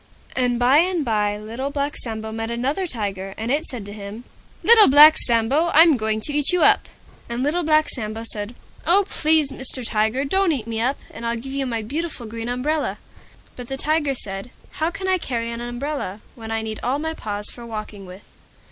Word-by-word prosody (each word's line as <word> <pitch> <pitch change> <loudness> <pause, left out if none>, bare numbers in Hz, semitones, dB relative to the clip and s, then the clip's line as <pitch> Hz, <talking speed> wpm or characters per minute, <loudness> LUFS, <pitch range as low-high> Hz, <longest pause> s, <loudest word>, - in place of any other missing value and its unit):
And 245 -2 +1
by 245 +4 +4
and 350 -3 +1
by 210 -2 0
Little 230 +6 -5
Black 285 +1 -2
Sambo 220 -2 -4
met 225 +1 -4
another 270 +10 -2
Tiger, 195 - -3
and 225 +2 -3
it 305 +4 0
said 235 -6 -4
to 205 - -8
him, 205 +2 -8 0.4
"Little 450 -2 +9
Black 300 +3 +9
Sambo, 250 +8 +2
I'm 325 -1 +7
going 220 -2 0
to 295 - -3
eat 295 +2 +4
you 360 -1 +2
up!" - - +5 0.4
And 235 +2 -2
Little 310 +5 0
Black 310 -1 +3
Sambo 220 -2 -5
said, 215 0 -3 0.3
"Oh! 385 +4 +4
Please 310 -5 +2
Mr. 260 -2 -3
Tiger, 220 +5 0
don't 380 +3 +2
eat 245 -7 -4
me 225 -1 -3
up, 260 +4 0
and 230 - -10
I'll 235 0 -1
give 265 +4 -8
you 275 -1 -2
my 230 -3 -2
beautiful 295 +1 -4
Green 230 +1 -6
Umbrella." 290 +5 -1 0.6
But 245 -1 -8
the 270 - -4
Tiger 295 -1 0
said, 195 -1 -6 0.3
"How 320 - +2
can 380 +2 -6
I 375 -1 +2
carry 235 -6 -3
an 235 0 -6
umbrella, 240 -4 -4
when 225 -2 -10
I 225 0 -2
need 220 -1 -5
all 260 +3 0
my 320 +2 -3
paws 205 -7 -5
for 240 - -11
walking 215 -3 -7
with?" 185 +3 -12
245 Hz, 205 wpm, -22 LUFS, 220-295 Hz, 0.6 s, Little